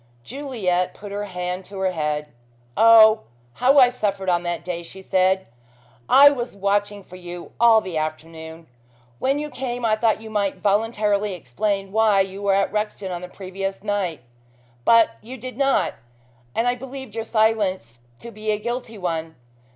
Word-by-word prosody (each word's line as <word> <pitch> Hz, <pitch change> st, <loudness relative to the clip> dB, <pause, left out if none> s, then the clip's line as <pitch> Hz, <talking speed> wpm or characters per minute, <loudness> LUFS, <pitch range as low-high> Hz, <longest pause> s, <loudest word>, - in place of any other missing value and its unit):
Juliet 205 Hz, -, -2 dB
put 205 Hz, 0 st, -10 dB
her 205 Hz, +1 st, -3 dB
hand 180 Hz, -1 st, -4 dB
to 195 Hz, -, -10 dB
her 190 Hz, -1 st, 0 dB
head. 150 Hz, -3 st, -2 dB, 0.5 s
"Oh, 225 Hz, -1 st, +7 dB, 0.3 s
how 260 Hz, -, +3 dB
I 255 Hz, -3 st, +8 dB
suffered 200 Hz, -6 st, -2 dB
on 175 Hz, -1 st, +2 dB
that 175 Hz, -1 st, -4 dB
day," 175 Hz, -1 st, -4 dB
she 170 Hz, +3 st, -11 dB
said. 190 Hz, 0 st, +1 dB, 0.6 s
"I 285 Hz, +1 st, +8 dB
was 245 Hz, -6 st, -4 dB
watching 205 Hz, +1 st, -1 dB
for 185 Hz, -, -13 dB
you 175 Hz, -1 st, -9 dB
all 230 Hz, -1 st, +6 dB
the 180 Hz, -5 st, -3 dB
afternoon. 160 Hz, +1 st, -6 dB, 0.5 s
When 270 Hz, +2 st, +1 dB
you 300 Hz, 0 st, -4 dB
came 245 Hz, -2 st, -4 dB
I 215 Hz, -1 st, +3 dB
thought 220 Hz, -1 st, +1 dB
you 220 Hz, 0 st, -10 dB
might 200 Hz, -2 st, 0 dB
voluntarily 205 Hz, 0 st, 0 dB
explain 195 Hz, -, -3 dB
why 215 Hz, -2 st, +4 dB
you 195 Hz, +1 st, -4 dB
were 200 Hz, -1 st, +2 dB
at 195 Hz, 0 st, +1 dB
Rexton 210 Hz, -2 st, -3 dB
on 175 Hz, -1 st, -4 dB
the 180 Hz, -, -7 dB
previous 195 Hz, +1 st, -6 dB
night. 200 Hz, -6 st, -2 dB, 0.6 s
But 230 Hz, -1 st, +5 dB
you 250 Hz, +4 st, -9 dB
did 255 Hz, +1 st, -8 dB
not, 270 Hz, -9 st, +1 dB, 0.6 s
and 230 Hz, -, +1 dB
I 245 Hz, -, +3 dB
believed 265 Hz, -2 st, -9 dB
your 225 Hz, 0 st, -3 dB
silence 210 Hz, -, 0 dB, 0.2 s
to 235 Hz, -, -8 dB
be 215 Hz, 0 st, -6 dB
a 210 Hz, -, +2 dB
guilty 235 Hz, +1 st, -5 dB
one. 165 Hz, -3 st, -3 dB
205 Hz, 170 wpm, -22 LUFS, 180-225 Hz, 0.6 s, I